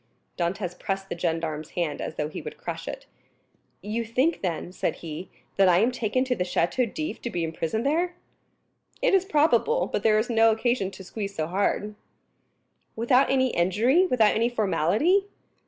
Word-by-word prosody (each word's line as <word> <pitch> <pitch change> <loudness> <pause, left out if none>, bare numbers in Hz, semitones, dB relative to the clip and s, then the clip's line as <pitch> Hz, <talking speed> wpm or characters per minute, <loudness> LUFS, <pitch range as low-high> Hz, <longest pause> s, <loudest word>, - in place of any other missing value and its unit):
Dantès 180 +1 -3
pressed 195 0 -3
the - - -3
gendarme's 165 -3 -3
hand 165 -4 -1
as - - -5
though 150 - -2
he 155 - -7
would - - -8
crush - - -6
it. - - -6 0.8
"You 215 +3 -2
think, 255 +9 0
then," 175 -1 -3
said 185 - -2
he, 165 +2 -7 0.3
"that 195 -1 +5
I 175 - +5
am 225 +7 +3
taken 245 +1 0
to 255 -1 0
the 180 - -1
Château 185 +6 0
d'If 310 0 -4
to 240 - -3
be 175 -6 -2
imprisoned 165 +8 -2
there?" 345 +5 +1 0.9
"It - - +3
is 380 -1 +4
probable; 315 - +3
but - - 0
there 215 0 +4
is 215 +3 +1
no 225 -1 +4
occasion 225 -2 +1
to 195 - -11
squeeze 200 +1 -5
so 155 - -1
hard." 200 +4 -1 1.0
"Without 250 +4 +3
any 260 -2 +2
inquiry, 230 - +3
without 225 -8 +4
any 230 +2 +2
formality?" 240 - +2
215 Hz, 175 wpm, -26 LUFS, 180-255 Hz, 1.0 s, that